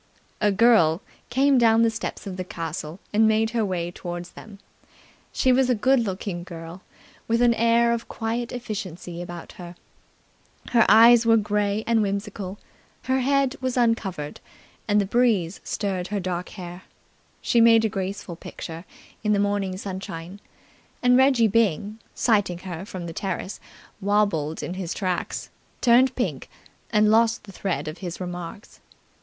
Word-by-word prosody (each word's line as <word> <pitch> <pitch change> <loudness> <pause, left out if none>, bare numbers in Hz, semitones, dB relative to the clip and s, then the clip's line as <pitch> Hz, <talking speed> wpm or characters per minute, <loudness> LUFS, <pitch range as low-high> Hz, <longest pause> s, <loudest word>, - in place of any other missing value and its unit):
A 210 -1 +3
girl 195 -5 +4 0.3
came 270 +1 +3
down 230 -1 +5
the 230 - +3
steps 220 -1 -5
of 195 -2 -5
the 185 - -4
castle 165 -1 -6
and 220 +1 +5
made 220 +1 +2
her 235 -2 0
way 175 -3 -2
towards 175 0 -7
them. 210 -2 -12 0.7
She 260 - +2
was 255 0 +3
a 250 - +3
good 260 +5 +3
looking 190 -4 -3
girl, 170 0 -9 0.5
with 230 +1 +2
an 240 -1 +5
air 235 +1 +3
of 235 0 -4
quiet 230 +1 -3
efficiency 190 -7 -6
about 175 -1 -8
her. 175 0 -9 1.0
Her 235 -2 +5
eyes 230 +2 +7
were 225 0 +6
grey 210 0 0
and 230 -1 +2
whimsical. 200 -1 -3 0.5
Her 260 +1 +1
head 275 +1 +1
was 255 -1 -2
uncovered, 200 -11 0 0.5
and 210 0 +3
the 200 - +1
breeze 205 -5 +1
stirred 190 -3 -2
her 205 +1 -2
dark 180 -1 -3
hair. 180 -2 -9 0.6
She 235 - +2
made 230 -1 +6
a - - +4
graceful 195 -3 -4
picture 165 0 -8 0.4
in 210 -1 +2
the 205 - +2
morning 200 -2 0
sunshine, 190 -1 -7 0.6
and 250 0 +5
Reggie 260 -3 +5
Byng, 210 -1 0 0.2
sighting 205 -7 +2
her 180 0 -6
from 185 -4 -6
the 165 - -6
terrace, 190 +1 -4 0.4
wobbled 195 -7 0
in 175 - -4
his 185 -2 -4
tracks, 185 -3 -3 0.3
turned 255 +2 +4
pink, - - -3 0.4
and 210 -1 +3
lost 230 +1 +3
the 205 - -12
thread 190 -4 -3
of 155 +3 -6
his 180 -3 -6
remarks. 180 +2 -7
205 Hz, 155 wpm, -24 LUFS, 180-230 Hz, 1.0 s, eyes